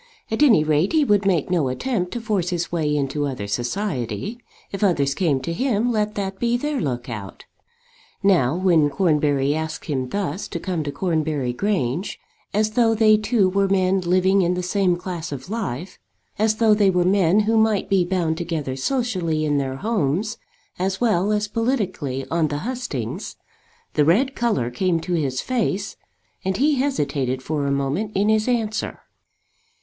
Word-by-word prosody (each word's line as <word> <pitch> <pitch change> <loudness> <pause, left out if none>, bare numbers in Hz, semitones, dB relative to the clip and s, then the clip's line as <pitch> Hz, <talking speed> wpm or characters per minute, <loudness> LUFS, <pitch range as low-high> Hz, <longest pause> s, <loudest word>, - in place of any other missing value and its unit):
At 225 - -1
any 230 - +6
rate 155 - +1
he 315 -2 +4
would 205 -4 +2
make 180 -3 +1
no 165 -7 +2
attempt 180 - -2
to 240 - -4
force 205 -6 -1
his 175 -1 -2
way 155 -3 0
into 145 +1 -1
other 130 -7 -4
society. 135 - -3 0.3
If 200 +1 -3
others 145 -8 +2
came 150 -4 +1
to 165 +6 -3
him 245 +2 +1
let 210 -1 -1
that 195 -1 -3
be 240 0 +1
their 295 +2 -2
look 125 -6 -3
out. 105 -5 -7 0.8
Now, 170 -9 +3
when 170 -5 +3
Cornbury 145 -3 +2
asked 160 0 -4
him 130 -4 -2
thus 200 +2 -3
to - - -5
come 180 -4 -2
to 145 - -2
Cornbury 155 -7 -1
Grange, 175 - -1 0.3
as 215 +1 +1
though 225 0 +3
they 215 -1 +5
two 215 -1 +2
were 195 +1 +1
men 190 0 +2
living 185 +2 +3
in 180 0 +1
the 180 - -3
same 180 -1 +1
class 175 -3 -5
of 140 +6 -7
life, 185 - -4 0.4
as 215 0 +3
though 220 -1 +4
they 205 -2 +4
were 180 -1 +2
men 190 +1 +4
who 220 +2 +1
might 220 -2 +2
be 195 -2 +3
bound 175 -3 -1
together 160 -6 -3
socially 175 - -1
in 145 -1 +1
their 135 -1 -2
homes 205 +2 -1 0.4
as 190 +1 -1
well 210 -4 +2
as 210 0 0
politically 195 - -2
on 165 -1 +2
the 145 +3 -4
hustings, 235 - -4 0.6
the 150 - +3
red 230 - +3
colour 210 - 0
came 175 +5 0
to 180 - -3
his 140 -6 0
face 215 -5 -1 0.5
and 190 0 -1
he 290 +2 +3
hesitated 140 - -1
for 145 -1 -1
a - - 0
moment 140 +10 -1
in 205 +2 +2
his 220 +1 +2
answer. 220 -3 -1
185 Hz, 175 wpm, -22 LUFS, 150-215 Hz, 0.8 s, any